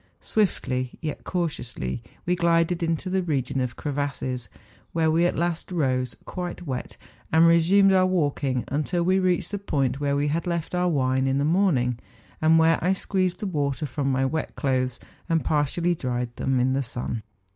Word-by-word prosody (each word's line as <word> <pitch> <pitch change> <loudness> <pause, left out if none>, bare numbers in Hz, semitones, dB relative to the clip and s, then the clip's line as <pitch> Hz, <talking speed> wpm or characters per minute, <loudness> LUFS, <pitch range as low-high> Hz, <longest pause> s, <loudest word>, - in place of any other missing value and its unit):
Swiftly, 130 - 0
yet 155 -3 -5
cautiously, 160 -10 -3 0.2
we 180 - +2
glided 170 0 +2
into 165 +2 -1
the 190 +1 +1
region 135 -6 -1
of 125 -1 -2
crevasses, 135 -5 -3 0.4
where 160 -1 +2
we 170 +2 +3
at - - -2
last 170 +2 -2
rose, 130 -7 0
quite 180 -1 -5
wet, 130 -4 -5 0.3
and 160 +1 +6
resumed 180 +4 +5
our 185 -1 +4
walking, 145 -8 0
until 155 +5 0
we 185 +2 +3
reached 185 -1 +1
the 205 - -2
point 140 -8 -1
where 140 -1 0
we 145 +1 +1
had 165 +4 -1
left 170 -1 -2
our 180 0 +2
wine 130 -3 +1
in 135 0 +1
the 140 - +1
morning, 150 -9 +2 0.4
and 160 +1 +5
where 165 0 +4
I 185 +2 +3
squeezed 185 -2 -1
the - - -2
water 145 -5 -1
from 140 0 -1
my 135 0 +1
wet 155 +4 -2
clothes, 130 -3 0 0.3
and 165 -1 +1
partially 155 +4 +1
dried 125 -5 -3
them 135 -1 0
in 130 +1 +2
the 135 - +1
sun. 120 -2 -4
155 Hz, 180 wpm, -25 LUFS, 130-175 Hz, 0.4 s, and